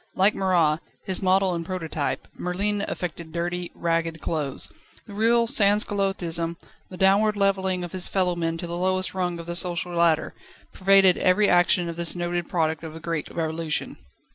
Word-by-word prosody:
Like 195 +3 +4
Marat, 170 -5 +2 0.3
his 190 -1 -1
model 190 0 +3
and 170 -1 -3
prototype, 165 -4 -3
Merlin 200 +3 -1
affected 170 -2 -5
dirty, 175 +1 -3
ragged 165 -1 -1
clothes. 150 -4 -2 0.4
The 205 - -11
real 230 +3 +3
Sanscullottism, 195 -6 +1 0.3
the 185 - -9
downward 200 +3 +3
levelling 190 -2 +1
of 175 - -6
his 185 -1 +3
fellowmen 175 -3 0
to 175 - -5
the 170 0 -5
lowest 185 +1 0
rung 180 -2 -2
of 170 - -8
the 170 0 -4
social 175 -1 -2
ladder, 170 -2 +2 0.4
pervaded 195 -1 +4
every 190 +3 +3
action 175 -1 +3
of 170 0 -6
this 170 0 -1
noted 175 -1 -2
product 160 -2 0
of 160 -1 -7
the - - -7
great 165 -2 -3
Revolution. 160 -1 -2
175 Hz, 165 wpm, -25 LUFS, 165-190 Hz, 0.4 s, Like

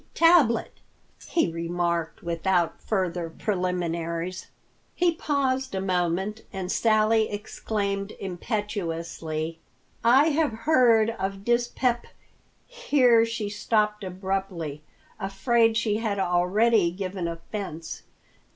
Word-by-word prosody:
Tablet," 330 -9 +4 0.5
he 330 - +2
remarked 170 0 -2
without 170 +1 0
further 180 -5 -1
preliminaries. 180 -1 -2 0.5
He 350 -1 +2
paused 270 -6 -1
a - - 0
moment, 190 +3 -1
and 190 -1 -4
Sally 220 0 +3
exclaimed 205 -1 -3
impetuously, 170 -5 -4 0.4
"I 265 +7 +6
have 300 -4 +1
heard 235 -7 +5
of 195 +1 -4
dyspep—" 240 0 +1 0.6
Here 260 - +3
she 225 -2 -3
stopped 210 0 0
abruptly, 185 -5 -3 0.4
afraid 225 +4 +2
she 220 -2 +1
had 215 -3 -2
already 190 +3 +3
given 185 0 -4
offense. 165 -1 -6
200 Hz, 95 wpm, -26 LUFS, 175-230 Hz, 0.6 s, I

